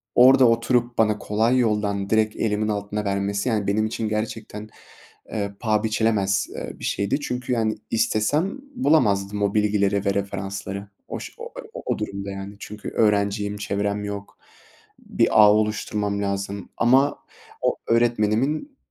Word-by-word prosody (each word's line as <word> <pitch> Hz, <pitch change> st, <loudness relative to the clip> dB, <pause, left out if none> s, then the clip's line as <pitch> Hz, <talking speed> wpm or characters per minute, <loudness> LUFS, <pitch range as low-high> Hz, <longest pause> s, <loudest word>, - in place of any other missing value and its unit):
orada 130 Hz, +1 st, +7 dB
oturup 120 Hz, +1 st, +1 dB
bana 110 Hz, -1 st, +3 dB
kolay 110 Hz, +5 st, +1 dB
yoldan 105 Hz, -4 st, 0 dB
direkt 110 Hz, -1 st, +2 dB
elimin 105 Hz, -1 st, 0 dB
altına 105 Hz, 0 st, -2 dB
vermesi, 100 Hz, +3 st, -1 dB
yani, 105 Hz, -3 st, 0 dB
benim 110 Hz, +2 st, +2 dB
için 110 Hz, 0 st, -2 dB
gerçekten, 110 Hz, 0 st, -4 dB, 0.6 s
eee, 100 Hz, -2 st, -3 dB
paha 110 Hz, -1 st, +1 dB
biçilemez, 105 Hz, -3 st, +1 dB
eee, -, -, -7 dB
bir -, -, -11 dB
şeydi. 100 Hz, +7 st, 0 dB
Çünkü, 125 Hz, -3 st, -3 dB
yani, 110 Hz, -2 st, 0 dB
istesem 145 Hz, -, +1 dB, 0.2 s
bulamazdım 105 Hz, -, +2 dB
o 100 Hz, 0 st, +1 dB
bilgileri 100 Hz, -1 st, +1 dB
ve 100 Hz, -, +2 dB
referansları. 100 Hz, 0 st, -4 dB, 0.2 s
Oş -, -, -7 dB
o -, -, -9 dB, 0.2 s
o -, -, -6 dB
o -, -, 0 dB
durumda, 100 Hz, 0 st, -4 dB
yani, 100 Hz, +1 st, -7 dB
çünkü 105 Hz, +1 st, -7 dB
öğrenciyim, 105 Hz, -1 st, +1 dB
çevrem 100 Hz, 0 st, -2 dB
yok, 100 Hz, -1 st, -6 dB, 0.6 s
bir -, -, +1 dB, 0.2 s
ağ 105 Hz, -, +8 dB
oluşturmam 105 Hz, -1 st, -1 dB
lazım 100 Hz, 0 st, -3 dB
ama 130 Hz, +4 st, +3 dB, 0.4 s
o -, -, +1 dB
öğretmenimin 120 Hz, -, +1 dB
105 Hz, 140 wpm, -23 LUFS, 100-115 Hz, 0.6 s, ağ